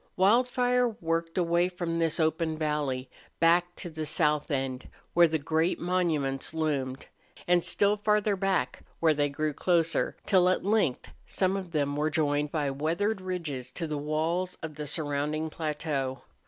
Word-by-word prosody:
Wildfire 245 +4 +3
worked 165 -1 -2
away 175 0 +2
from 175 -2 -3
this 165 0 +1
open 160 0 +1
valley, 150 -4 -1 0.3
back 175 +1 +3
to - - -7
the 155 -2 -5
south 150 -1 +1
end, 135 -3 -2 0.2
where 175 0 +6
the 160 0 0
great 160 +3 0
monuments 160 -6 0
loomed, 140 -4 -1 0.4
and 175 -1 +4
still 205 +1 +2
farther 210 0 +2
back, 195 -1 -1 0.2
where 160 -2 +4
they 145 -1 +1
grew 150 +2 -2
closer, 170 0 +1
till 185 -3 +4
at 185 - 0
length 200 - +1 0.2
some 190 0 +1
of 190 -2 -4
them 145 -3 0
were 150 +1 +1
joined 145 -2 0
by 145 -4 0
weathered 170 +9 -1
ridges 165 -9 -4
to 165 +6 -4
the 150 -2 -3
walls 160 +5 -1
of 160 -1 -5
the 150 0 -6
surrounding 150 +1 -2
plateau. 150 -5 -3
160 Hz, 155 wpm, -28 LUFS, 150-180 Hz, 0.4 s, where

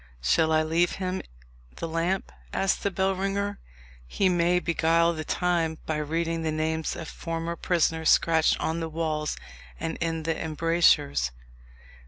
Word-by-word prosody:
"Shall 160 - +3
I 155 0 +4
leave 165 +2 +1
him 185 -1 -3 0.5
the 165 - -4
lamp?" 170 +4 -1 0.2
asked 195 0 0
the 200 - +1
bellringer; 195 +2 -1 0.5
"he 190 - +1
may 175 0 +3
beguile 170 0 +2
the 155 -1 -4
time 165 -1 0
by 155 - -1
reading 165 +2 -1
the 160 -1 -1
names 160 +1 -1
of 165 - -6
former 165 0 -4
prisoners 160 -2 +1
scratched 160 -1 +4
on 160 +1 -1
the 165 -1 -3
walls 155 -1 -2 0.4
and 165 - -3
in 165 -1 -2
the 165 0 0
embrasures." 160 - +2
165 Hz, 145 wpm, -27 LUFS, 160-175 Hz, 0.5 s, I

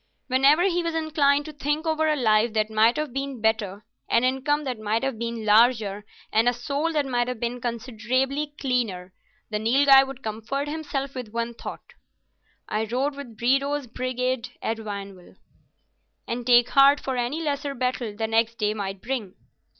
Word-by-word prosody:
Whenever 275 +6 +4
he 355 -2 +2
was 335 -1 -3
inclined 295 -3 +2
to 310 - -8
think 295 +2 -2
over 315 -1 +1
a 305 - +2
life 220 -3 +2
that 215 0 0
might 220 +2 +4
have 300 -4 -3
been 275 -1 -4
better, 215 -2 -1 0.2
an 230 - +3
income 265 +4 +1
that 255 -5 -4
might 215 +2 -1
have 270 -5 -2
been 230 -1 -4
larger, 215 -2 +3 0.3
and 225 +2 +4
a - - -1
soul 280 +6 -2
that 295 -2 +1
might 245 -2 0
have 250 -2 -4
been 240 +1 -3
considerably 255 +5 -2
cleaner, 215 -9 -2 0.4
the 210 - -1
Nilghai 270 +5 +6
would 270 -1 -9
comfort 225 +7 -3
himself 290 -3 -4
with 250 -5 -7
the 235 +1 -3
thought, - - -8 0.7
"I 215 +1 -1
rode 260 +6 -1
with 265 -6 -10
Bredow's 275 +4 +1
brigade 250 0 -2
at 225 - -2
Vionville," 200 -4 -8 0.9
and 235 +1 -4
take 245 -1 +6
heart 280 +1 +6
for 265 - -3
any 245 +5 -1
lesser 285 -3 -2
battle 250 -3 -2
the 220 +1 -2
next 225 +1 +1
day 210 -1 0
might 195 -2 -5
bring. 235 -8 -4
250 Hz, 175 wpm, -25 LUFS, 220-280 Hz, 0.9 s, Nilghai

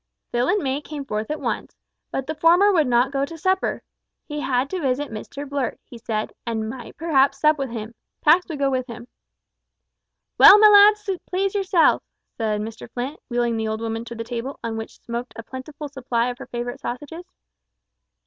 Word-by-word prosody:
Phil 240 +2 +1
and 415 +2 +1
May 270 +1 -1
came 295 -1 -7
forth 215 -2 -3
at 305 - -3
once, - - -3 0.3
but 270 - -3
the 315 - -3
former 350 +6 +5
would 315 -6 +3
not 250 +2 +2
remain 275 0 0
to 330 - -9
supper. 375 +4 0 0.4
He 295 -1 -5
had 260 -2 0
to 375 -2 -2
visit 275 0 -1
Mr 275 +6 -7
Blurt, 275 -2 -2
he 240 - -12
said, 220 -2 -3
and 220 -2 -2
might 240 +1 -8
perhaps 275 -4 +2
sup 305 0 +3
with 270 -2 -2
him. 225 -1 -6 0.3
Pax 335 +4 +5
would 315 - -4
go 275 -1 +1
with 255 -1 -1
him. 235 0 -9 1.3
"Well, 405 - +11
my 425 0 +8
lads, 420 +1 +7 0.2
please 385 +1 -1
yourselves," 385 -4 +3 0.3
said 215 -2 -1
Mr 220 +1 -7
Flint, 255 +4 -4
wheeling 240 -1 0
the 220 0 -1
old 220 0 -2
woman 225 0 -3
to 235 0 -8
the 230 - -4
table, 245 +4 -5
on 230 -1 -3
which 225 0 -7
smoked 235 +1 -5
a 230 - -7
plentiful 280 +5 -8
supply 250 -3 -1
of 245 - -11
her - - -9
favourite 240 0 -5
sausages. 295 +8 -6
265 Hz, 195 wpm, -23 LUFS, 235-310 Hz, 1.3 s, Well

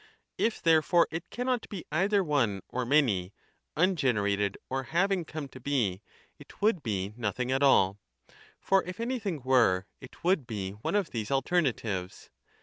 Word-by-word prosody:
If 225 0 0
therefore, 165 +1 +4
it 165 +2 -5
cannot 250 -1 -2
be 195 -5 -7
either 195 +5 +2
one 120 - 0
or 125 -1 -3
many, 110 -10 +2 0.4
ungenerated 105 - +1
or 135 +1 -2 0.2
having 195 -2 +2
come 155 -2 -6
to 130 - -12
be, 120 -8 -1 0.4
it - - -15
would 205 -5 +2
be 100 -4 -3
nothing 120 +2 -2
at 135 +1 +1
all. 100 -8 +4 0.6
For 195 -1 +2
if 180 +4 -7
anything 225 - -2
20 - - -16
were, 110 -8 +4
it 130 - -14
would 175 -8 +2
be 100 -4 -4
one 105 - -4
of 200 -4 0
these 110 -3 -4
alternatives. 130 - -1
135 Hz, 155 wpm, -29 LUFS, -, 0.6 s, therefore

